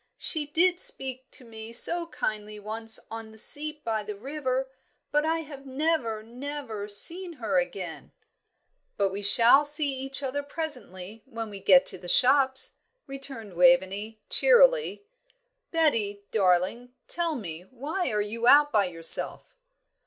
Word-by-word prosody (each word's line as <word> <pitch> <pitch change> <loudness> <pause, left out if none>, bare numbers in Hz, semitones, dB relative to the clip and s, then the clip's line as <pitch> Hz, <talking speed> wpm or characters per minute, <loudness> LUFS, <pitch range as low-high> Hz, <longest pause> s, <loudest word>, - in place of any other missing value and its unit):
"She 305 -3 0
did 350 +4 +2
speak 265 - -5
to 255 - -16
me 220 0 -9
so 335 +8 +2
kindly 215 -8 -5
once 220 +2 -3
on 225 -1 -7
the 220 - -16
seat 300 +6 0
by 220 -3 -2
the 210 0 -7
river; 265 +2 -3 0.4
but 295 +1 +1
I 325 0 0
have 280 -3 -11
never, 265 -6 -1
never 245 -3 -7
seen 340 - +3
her 220 - -1
again." 180 +1 -6 0.9
"But 200 -1 +1
we 200 +2 -5
shall 230 +7 +5
see 295 -1 0
each 270 +1 -3
other 275 +2 -2
presently, 250 - -7
when 225 -4 -7
we 200 - -8
get 185 -2 +5
to - - -3
the 175 - -9
shops," 265 +2 +3 0.3
returned 270 -7 -8
Waveney, 215 0 +2
cheerily. - - +3 0.7
"Betty, 225 -12 0
darling, 195 +5 0
tell 335 -2 0
me, 175 - -8
why 290 +7 -4
are 210 -2 -1
you 230 +3 -3
out 290 +2 +6
by 205 -2 +2
yourself?" 170 - +3
250 Hz, 145 wpm, -26 LUFS, 210-295 Hz, 0.9 s, out